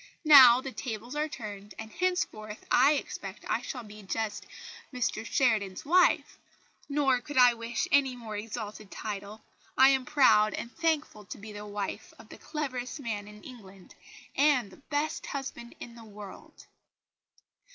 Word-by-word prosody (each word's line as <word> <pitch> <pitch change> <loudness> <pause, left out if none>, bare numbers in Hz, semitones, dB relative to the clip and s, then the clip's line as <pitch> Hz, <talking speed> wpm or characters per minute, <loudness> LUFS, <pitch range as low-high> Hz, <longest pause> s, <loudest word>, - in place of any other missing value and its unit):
Now 260 -5 +9
the 270 - -6
tables 240 +1 -6
are 300 +1 0
turned, 205 -6 -8
and, 220 0 -8
henceforth, 220 - -2
I 290 - +6
expect 290 - -6
I - - 0
shall 250 -3 -6
be 210 0 -12
just 205 +1 -4 0.4
Mr 245 -4 -2
Sheridan's 220 -6 0
wife. 360 +5 +3 0.5
Nor 275 -3 +2
could 290 +3 -7
I 250 -1 +7
wish 230 0 -3
any 270 -2 +3
more 225 -3 -8
exalted 215 -1 -6
title. 210 +1 -7 0.3
I 265 +1 +8
am 265 -2 +2
proud 220 -7 +4
and 235 - -7
thankful 315 -10 -1
to 185 - -8
be 210 +1 -10
the 210 0 -8
wife 205 +1 -5
of 220 -1 -16
the - - -12
cleverest 280 -4 -4
man 215 -6 -4
in 210 0 -13
England, 195 -7 -13 0.4
and 275 -8 +3
the - - -15
best 295 +1 -2
husband 260 -4 -6
in 235 - -9
the 230 -1 -13
world!" 205 -2 -12
235 Hz, 155 wpm, -29 LUFS, 210-270 Hz, 0.5 s, Now